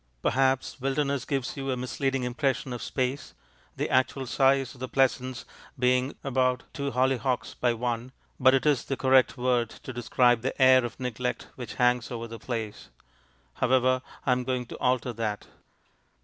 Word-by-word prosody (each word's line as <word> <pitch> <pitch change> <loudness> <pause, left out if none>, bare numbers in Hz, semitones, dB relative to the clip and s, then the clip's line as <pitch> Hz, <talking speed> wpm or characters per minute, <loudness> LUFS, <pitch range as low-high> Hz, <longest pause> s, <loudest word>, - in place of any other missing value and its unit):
Perhaps 130 0 +1
"wilderness" 135 -1 0
gives 135 -2 -2
you 135 -1 -4
a 130 - 0
misleading 135 +1 -1
impression 130 +1 -1
of 120 - -5
space, 130 +1 -3 0.4
the - - -1
actual 130 +1 +1
size 135 0 +2
of 130 - -16
the 130 0 -5
pleasaunce 130 -1 0 0.3
being 125 +1 +1
about 130 -2 +1
two 140 -1 -2
hollyhocks 130 -1 0
by 120 - +1
one, 120 +1 -3 0.3
but 130 +1 +6
it 135 - 0
is 145 -4 +3
the 135 - -3
correct 130 -1 +4
word 125 -2 +1
to 130 - -9
describe 120 0 +2
the 135 +4 -3
air 130 -1 +7
of 120 -2 -6
neglect 125 0 -3
which 125 -2 -7
hangs 125 -1 +2
over 115 -1 -5
the 115 0 -9
place. 110 -3 -5 0.6
However, 130 0 +2 0.2
I 135 - +3
am 125 0 +1
going 125 -1 -2
to - - -9
alter 125 -1 +1
that. 110 -2 -3
130 Hz, 165 wpm, -27 LUFS, 125-135 Hz, 0.6 s, air